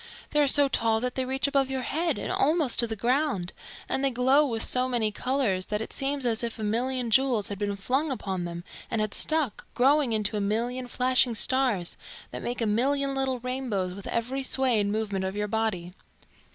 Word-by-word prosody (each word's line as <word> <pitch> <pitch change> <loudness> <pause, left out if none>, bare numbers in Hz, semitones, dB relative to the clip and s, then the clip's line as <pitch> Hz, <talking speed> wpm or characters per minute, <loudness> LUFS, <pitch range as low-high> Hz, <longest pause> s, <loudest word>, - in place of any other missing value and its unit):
They 295 - +1
are 290 - +3
so 285 +1 +6
tall 225 -4 +1
that 250 0 -2
they 260 - -2
reach 265 +2 0
above 275 -2 +1
your 265 -1 -2
head 325 +1 -1
and - - -4
almost 300 -3 +2
to 235 - +2
the 220 - -3
ground, 240 - 0 0.3
and 265 - -1
they 275 - +3
glow 260 +4 +3
with 225 -3 -2
so 255 0 +2
many 230 -4 +1
colours 230 -7 -1
that 210 -1 -2
it 220 - -6
seems 275 -1 -1
as 230 -1 +1
if 230 -1 -3
a 220 - -5
million 240 +3 -1
jewels 250 -4 +2
had 200 -1 -6
been 205 -1 -1
flung 265 +10 -1
upon 190 -8 -3
them 170 0 -6 0.3
and 225 - -1
had 215 -1 -1
stuck, 310 -8 0
growing 275 +1 +3
into 215 -1 0
a 210 - -1
million 240 +5 -2
flashing 250 -1 +2
stars 245 -8 0 0.3
that - - -6
make 245 0 -4
a - - +1
million 275 +6 +1
little 265 -1 -1
rainbows 245 -8 -2
with 200 +1 -9
every 250 +4 -2
sway 260 -3 +4
and 205 0 0
movement 205 -3 -2
of 190 +1 -3
your 210 0 -2
body." 205 -5 -2
245 Hz, 210 wpm, -27 LUFS, 210-265 Hz, 0.3 s, so